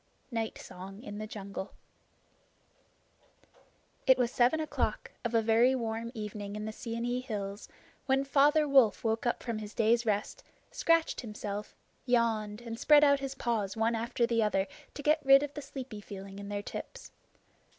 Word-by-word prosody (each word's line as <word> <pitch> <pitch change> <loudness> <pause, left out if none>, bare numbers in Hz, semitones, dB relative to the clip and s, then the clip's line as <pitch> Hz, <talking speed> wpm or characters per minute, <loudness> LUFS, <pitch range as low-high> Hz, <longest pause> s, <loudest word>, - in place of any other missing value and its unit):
Night 225 -2 -2
Song 195 +4 -10
in 205 -4 -7
the 215 - -5
Jungle 200 -2 -7 2.3
It 260 -1 +7
was 245 -1 +1
seven 255 +6 +3
o'clock 310 - -2
of 235 -1 -1
a 225 - +4
very 230 +4 +4
warm 230 -1 -3
evening 210 -1 -5
in 210 0 -4
the 220 - -3
Seeonee 235 +2 -3
hills 205 -5 -5 0.4
when 270 0 +3
Father 295 +2 +4
Wolf 265 -7 +4
woke 225 +1 0
up 240 - -1
from 230 -3 -3
his 210 0 -8
day's 230 +1 +3
rest, 210 -2 -2 0.3
scratched 330 -1 +2
himself, 210 -2 -6 0.3
yawned, 225 -3 +1
and 230 -1 -6
spread 295 -1 +6
out 280 -1 +5
his 275 0 -4
paws 225 -5 -1
one 225 +1 +2
after 235 +1 0
the 230 -1 +1
other 200 -3 +2 0.3
to 290 - -6
get 305 +1 +3
rid 275 +1 +7
of 290 0 -5
the 295 - -6
sleepy 255 -7 -7
feeling 195 0 -9
in 200 0 -7
their 205 0 -3
tips. - - -8
230 Hz, 165 wpm, -31 LUFS, 210-260 Hz, 2.3 s, It